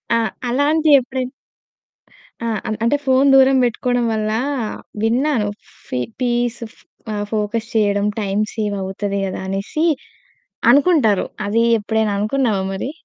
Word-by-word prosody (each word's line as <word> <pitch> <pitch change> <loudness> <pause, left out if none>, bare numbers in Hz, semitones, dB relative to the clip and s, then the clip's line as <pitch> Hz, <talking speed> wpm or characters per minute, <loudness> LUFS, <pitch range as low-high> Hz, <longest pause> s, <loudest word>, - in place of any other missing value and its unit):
ఆ! - - +4 0.3
అలాంటియి 295 +4 +4
ఎప్పుడైనా 255 0 -4 1.1
ఆ! - - -1 0.2
ఆన్ 220 - -1
అంటే 235 +5 +3
ఫోను 265 +1 +4
దూరం 265 0 +6
పెట్టుకోవడం 245 0 0
వల్ల, 215 0 -1 0.7
విన్నాను 240 -1 +1 0.4
ఫీ 125 - -2 0.2
పీస్ 240 -1 0 0.5
ఆహ్, 205 0 -2
ఫోకస్ 220 +1 -2
చేయడం, 205 -2 +2 0.2
టైమ్ 200 +1 0
సేవ్ 210 -2 -2
అవుతది 200 +1 -3
కదా! 190 - -4
అనేసి 195 - -2 0.9
అనుకుంటారు. 275 - +4 0.2
అది 225 +3 +2 0.2
ఎప్పుడైనా 220 0 0
అనుకున్నావా 215 -1 0
మరి? 195 +7 -4
230 Hz, 120 wpm, -19 LUFS, 205-260 Hz, 1.1 s, దూరం